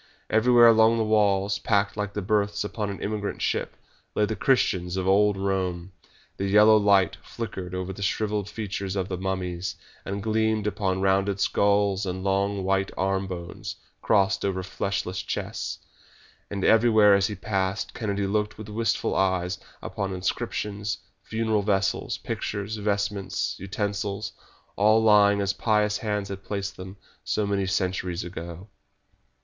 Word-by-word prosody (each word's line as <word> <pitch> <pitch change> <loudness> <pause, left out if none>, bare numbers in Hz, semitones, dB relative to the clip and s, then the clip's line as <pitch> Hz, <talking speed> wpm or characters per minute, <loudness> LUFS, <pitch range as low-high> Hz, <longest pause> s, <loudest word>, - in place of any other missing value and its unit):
Everywhere 120 +2 +6
along 115 0 +6
the 115 - +2
walls, 100 -2 +2
packed 100 -1 +1
like 105 -1 -3
the 105 - -3
berths 105 0 +1
upon 105 0 -3
an 100 - -5
emigrant 105 -1 -3
ship, - - -1 0.4
lay 105 - +3
the 110 - -3
Christians 90 -9 +1
of 95 0 -1
old 100 +1 +4
Rome. 95 -2 -2 0.5
The 100 - -1
yellow 105 +2 +6
light 100 -3 +4
flickered 95 -6 -6
over 95 +1 -3
the 100 - -9
shrivelled 105 0 -1
features 100 -3 -4
of 95 -1 -2
the 90 - -2
mummies, 95 -1 -3 0.3
and 100 0 -4
gleamed 110 -1 +1
upon 95 -3 -1
rounded 95 +1 +2
skulls 100 -1 +2
and 95 +1 -4
long, 100 0 0
white 95 0 +1
armbones 95 -3 -3 0.3
crossed 100 -1 +2
over 95 -1 -1
fleshless 95 0 -3
chests. - - -4 0.7
And 100 -2 -2
everywhere 110 -2 +6
as 100 0 +3
he 105 - -5
passed 95 -1 -2
Kennedy 100 -3 -2
looked 105 +2 -1
with 110 -1 -9
wistful 115 +1 0
eyes 95 -1 0 0.2
upon 95 -1 -3
inscriptions, 100 +3 -2 0.2
funeral 110 -1 0
vessels, 100 -1 0
pictures, 105 +1 -4
vestments, 100 -1 -1
utensils, 100 +1 -3 0.4
all 110 +2 +4
lying 105 -2 +5
as 100 0 0
pious 105 -2 +1
hands 105 -2 -2
had 100 0 -6
placed 100 -1 -4
them 95 +2 -9 0.3
so 105 - 0
many 100 -1 0
centuries 90 -1 -1
ago. 85 +1 -8
100 Hz, 145 wpm, -26 LUFS, 95-105 Hz, 0.7 s, Everywhere